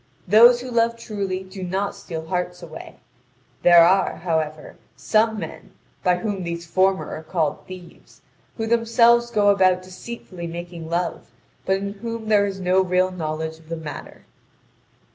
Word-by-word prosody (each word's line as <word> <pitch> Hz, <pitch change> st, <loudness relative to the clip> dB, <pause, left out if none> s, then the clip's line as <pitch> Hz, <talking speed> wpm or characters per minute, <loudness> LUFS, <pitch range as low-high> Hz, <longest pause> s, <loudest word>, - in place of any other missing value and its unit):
Those 235 Hz, +5 st, +7 dB
who 255 Hz, 0 st, -7 dB
love 230 Hz, 0 st, +1 dB
truly 200 Hz, -5 st, -4 dB
do 190 Hz, +1 st, -10 dB
not 190 Hz, +3 st, -2 dB
steal 170 Hz, -5 st, -7 dB
hearts 180 Hz, +1 st, -3 dB
away; -, -, -10 dB, 0.7 s
there 175 Hz, -1 st, +8 dB
are, 190 Hz, +2 st, +3 dB
however, 155 Hz, -3 st, -3 dB, 0.2 s
some 215 Hz, +11 st, +1 dB
men, 165 Hz, -6 st, -8 dB, 0.3 s
by 180 Hz, -1 st, +3 dB
whom 200 Hz, 0 st, -3 dB
these 170 Hz, -1 st, -5 dB
former 190 Hz, +3 st, +1 dB
are -, -, -6 dB
called 160 Hz, -1 st, -1 dB
thieves, 185 Hz, -2 st, -13 dB, 0.4 s
who 225 Hz, -, -2 dB
themselves 235 Hz, +1 st, +3 dB
go 210 Hz, -3 st, +3 dB
about 185 Hz, -2 st, +3 dB
deceitfully 185 Hz, -2 st, -8 dB
making 170 Hz, -1 st, -7 dB
love, 170 Hz, -5 st, -2 dB, 0.4 s
but 190 Hz, 0 st, +3 dB
in 200 Hz, +1 st, -4 dB
whom 230 Hz, +1 st, -6 dB
there 205 Hz, -1 st, +4 dB
is 195 Hz, -1 st, -5 dB
no 185 Hz, +1 st, +3 dB
real 185 Hz, 0 st, +1 dB
knowledge 160 Hz, -2 st, -4 dB
of 160 Hz, 0 st, -20 dB
the 165 Hz, -, -3 dB
matter. 155 Hz, -2 st, -9 dB
185 Hz, 155 wpm, -22 LUFS, 170-210 Hz, 0.7 s, there